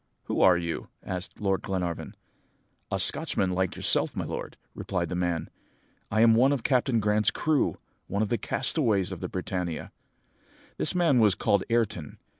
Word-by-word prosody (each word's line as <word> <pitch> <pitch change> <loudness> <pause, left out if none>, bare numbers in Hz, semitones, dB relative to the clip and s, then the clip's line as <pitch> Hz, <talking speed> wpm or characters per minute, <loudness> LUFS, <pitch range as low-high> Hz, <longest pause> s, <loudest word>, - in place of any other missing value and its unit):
"'Who - - -2
are 90 -2 +6
you?' 85 -1 -4 0.2
asked 90 0 -6
Lord 95 -2 0
Glenarvan. 90 -4 -4 0.8
"'A - - 0
Scotchman 95 -1 +2
like 95 0 -1
yourself, - - +4
my - - -3
lord,' - - -6 0.2
replied 90 -3 -3
the 90 - -3
man; 90 -2 -1 0.6
'I 110 +1 +1
am 115 0 +6
one 125 +5 +4
of 135 -5 -1
Captain 125 -3 +2
Grant's 105 0 +2
crew 155 -2 0 0.3
one 100 +2 -1
of 105 - -3
the 120 - 0
castaways 115 - +1
of - - -6
the - - -5
Britannia.' 90 -3 -4 0.9
"This - - 0
man 165 -8 +3
was 105 -4 +4
called 100 -2 +1
Ayrton. 110 -10 -1
100 Hz, 165 wpm, -27 LUFS, 90-115 Hz, 0.9 s, are